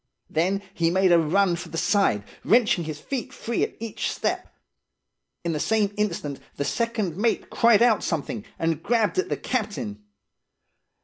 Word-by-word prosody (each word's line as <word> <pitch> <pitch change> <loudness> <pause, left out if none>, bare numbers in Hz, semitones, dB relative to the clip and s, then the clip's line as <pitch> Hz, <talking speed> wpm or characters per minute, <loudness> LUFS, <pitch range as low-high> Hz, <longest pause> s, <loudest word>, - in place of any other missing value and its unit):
Then 190 +5 +1
he 170 -5 +1
made 185 +1 +3
a 170 - +7
run 175 +3 +2
for 170 - -7
the 165 - -5
side, 170 - +2 0.2
wrenching 215 -7 +3
his 155 -1 -5
feet 265 - -4
free 235 -4 -3
at - - -1
each 225 -2 -3
step. - - -2 0.9
In 170 -1 -1
the 150 - -2
same 210 +2 +1
instant 170 -9 -2 0.2
the 140 - -2
second 225 -6 -1
mate 225 +3 0
cried 230 -1 +5
out 235 -3 +4
something, 140 -9 -2
and 165 -1 0
grabbed 225 - +1
at 375 0 -1
the - - -1
captain. 205 - -3
195 Hz, 165 wpm, -25 LUFS, 165-225 Hz, 0.9 s, a